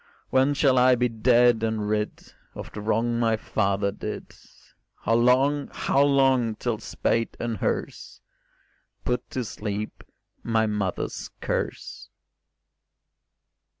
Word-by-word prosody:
When 135 +2 +3
shall 135 -3 +4
I 125 0 +6
be 125 0 +1
dead 120 0 +3
and 110 -2 -1
rid 105 0 -3 0.2
Of - - -8
the 105 - -7
wrong 115 +2 0
my 115 -2 +2
father 100 -2 0
did? - - -7 0.7
How 115 - +1
long, 130 +5 +3
how 135 - +1
long, 135 -5 +3
till 115 -1 -2
spade 115 0 -1
and 115 -2 -2
hearse - - -3 0.9
Put 125 - -2
to 125 -2 -3
sleep 105 0 -5 0.4
my 115 -1 +1
mother's 105 -4 -3
curse? - - -4
115 Hz, 115 wpm, -25 LUFS, 110-125 Hz, 0.9 s, I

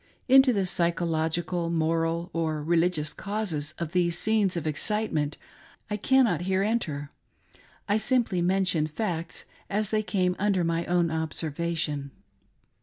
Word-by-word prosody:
Into 265 0 +7
the 200 -5 0
psychological, 170 -1 0
moral, 165 +1 0
or 155 -2 -1
religious 165 -1 +1
causes 180 -8 -4
of 170 -2 -4
these 175 -2 +1
scenes 210 -4 +2
of 165 - -3
excitement 155 -2 -1 0.5
I 210 - 0
cannot 235 - +3
here 190 +1 +1
enter; 155 -10 -2 0.4
— - - -29
I 205 +1 +2
simply 220 -5 +1
mentioii 180 -4 +1
facts 170 -1 -4 0.2
as 210 +1 0
they 215 -1 +2
came 185 -4 0
under 195 -3 +1
my 165 0 -1
own 175 -2 +2
observation. 160 -2 -2
170 Hz, 130 wpm, -27 LUFS, 160-200 Hz, 0.5 s, Into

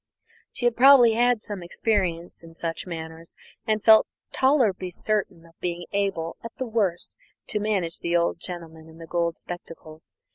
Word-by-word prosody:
She 245 - -4
had 240 -1 +3
probably 250 -3 +7
had 240 -1 +2
some 205 -3 -6
experience 175 -2 -2
in 165 -1 -14
such 165 +2 -4
matters, 160 -1 -8 0.3
and 215 -1 0
felt 220 -1 +7 0.2
tolerably 240 -10 +2
certain 185 -3 -2
of 165 - -19
being 175 -1 -4
able, 195 -5 -2
at 230 - -8
the 260 - -3
worst, 210 -7 -1 0.4
to 215 - -1
manage 195 -6 -1
the 170 0 +1
old 170 0 0
gentleman 165 -3 -8
in 160 - -15
the 165 - -10
gold 170 0 -1
spectacles. 165 -2 -10
180 Hz, 160 wpm, -25 LUFS, 165-220 Hz, 0.4 s, probably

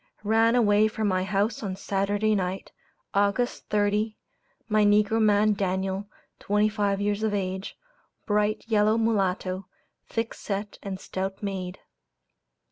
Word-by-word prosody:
Ranaway 220 -1 +4
from 220 0 -2
my 185 -1 +1
house 200 +3 0
on 195 -4 -3
Saturday 205 +3 0
night, 190 -1 -2 0.4
August 205 +5 0
30, 210 +1 +1 0.5
my 215 -1 +3
negro 210 +2 +3
man 210 0 +4
'Daniel,' 190 0 -2 0.3
twenty 210 +1 +2
five 205 -2 0
years 205 +1 0
of 215 -1 0
age, 190 0 -3 0.5
bright 210 0 +1
yellow 215 -1 +3
mulatto, 195 -4 0 0.4
thick 230 0 -2
set 205 0 -5
and 195 -2 -5
stout 190 +2 -4
made. 190 -2 -4
205 Hz, 125 wpm, -26 LUFS, 195-215 Hz, 0.5 s, Ranaway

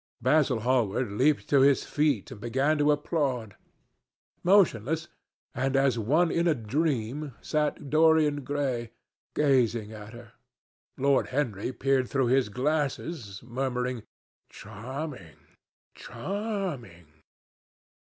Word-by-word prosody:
Basil 130 -1 +2
Hallward 120 -2 +1
leaped 140 +8 +2
to 140 -2 +5
his 140 0 +4
feet 145 -8 0
and 110 -5 -10
began 135 +6 +1
to 145 0 +4
applaud. 140 - -1 0.9
Motionless, 160 - +3 0.4
and 135 +2 -1
as 135 -3 +2
one 155 +10 +2
in 170 +1 +1
a 160 - +3
dream, 135 +2 -2
sat 150 -1 -2
Dorian 155 -2 +4
Gray, 130 -4 -2 0.4
gazing 120 -7 +2
at 105 +1 -10
her. 120 -1 -12 0.7
Lord 140 0 +2
Henry 125 -6 -2
peered 130 -1 0
through 135 -3 +1
his 130 -5 +2
glasses, 135 - -2
murmuring, 125 0 -2 0.5
"Charming! 110 - -8 0.6
charming!" 190 - -5
135 Hz, 105 wpm, -27 LUFS, 115-150 Hz, 0.9 s, to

